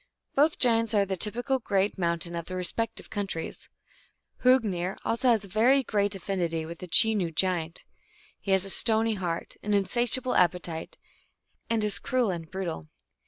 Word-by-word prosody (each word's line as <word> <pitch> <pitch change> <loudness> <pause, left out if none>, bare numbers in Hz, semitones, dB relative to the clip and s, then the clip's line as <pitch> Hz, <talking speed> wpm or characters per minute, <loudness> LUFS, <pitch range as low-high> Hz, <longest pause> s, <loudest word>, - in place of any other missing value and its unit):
* - - -60
Both 300 +3 +3
giants 230 -3 +2
are 200 -1 +3
the 190 0 -3
typical 245 +8 0
great 200 -3 0
mountain 170 0 0
of 170 -1 -4
their 185 - -5
respective 225 +6 -2
countries. 195 -6 -5 0.7
Hrungnir 205 -8 +2
has 230 +3 -1
also 225 -5 +3
very 240 +8 +3
great 205 -3 0
affinity 170 -4 -2
with 170 +1 -8
the 180 - -8
Chenoo 210 0 +4
giant. 170 -1 -1 0.5
He - - -9
has 190 0 +3
a 195 - -2
stony 225 +1 +3
heart, 175 -4 -4
an 210 0 0
insatiable 240 +5 +1
appetite, 175 -2 0 0.7
and 225 -2 +1
is 210 -1 -1
cruel 250 -6 0
and 165 -3 -6
brutal. 175 - -5
200 Hz, 160 wpm, -27 LUFS, 175-225 Hz, 0.7 s, Chenoo